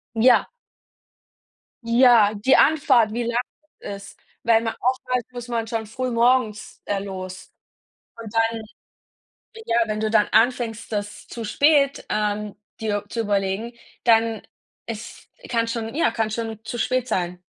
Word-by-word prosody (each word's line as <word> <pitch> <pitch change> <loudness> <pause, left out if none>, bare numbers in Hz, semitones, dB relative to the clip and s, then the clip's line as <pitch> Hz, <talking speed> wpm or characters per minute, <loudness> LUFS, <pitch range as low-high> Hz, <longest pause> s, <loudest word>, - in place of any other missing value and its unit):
Ja. 240 +3 +5 1.4
Ja, 235 -3 +5
die 215 +6 +3
Anfahrt, 265 -7 +4
wie 240 +2 -2
lang 235 +1 0 0.4
das 200 0 -7
ist. - - -32 0.2
Weil 225 -1 +4
man 225 -1 -2
oft 255 +1 0
halt, 250 -3 0
muss 245 -1 -7
man 230 -1 -2
schon 225 -1 -3
früh 255 +4 -4
morgens, 235 -2 +1
äh, 200 -1 -1
los. 185 -1 -7 0.7
Und 225 -2 -8
dann 225 0 +1 1.1
ja, 230 - +1
wenn 215 0 -3
du 215 0 0
dann 215 -2 +4
anfängst, 230 0 +1
das 205 -1 -4
zu 230 -2 -6
spät, 280 +4 +2
ähm, 210 0 -2 0.2
dir 205 -2 -1
zu 230 - -2
überlegen, 205 +2 -1 0.3
dann 225 -2 +3 0.5
ist 225 0 -8 0.2
kann 230 -1 +1
schon 230 +1 -4
ja, 320 - +2
kann 225 -1 -1
schon 225 -1 -5
zu 240 - -5
spät 255 +1 0
sein. 180 -3 -2
225 Hz, 145 wpm, -23 LUFS, 210-240 Hz, 1.4 s, Ja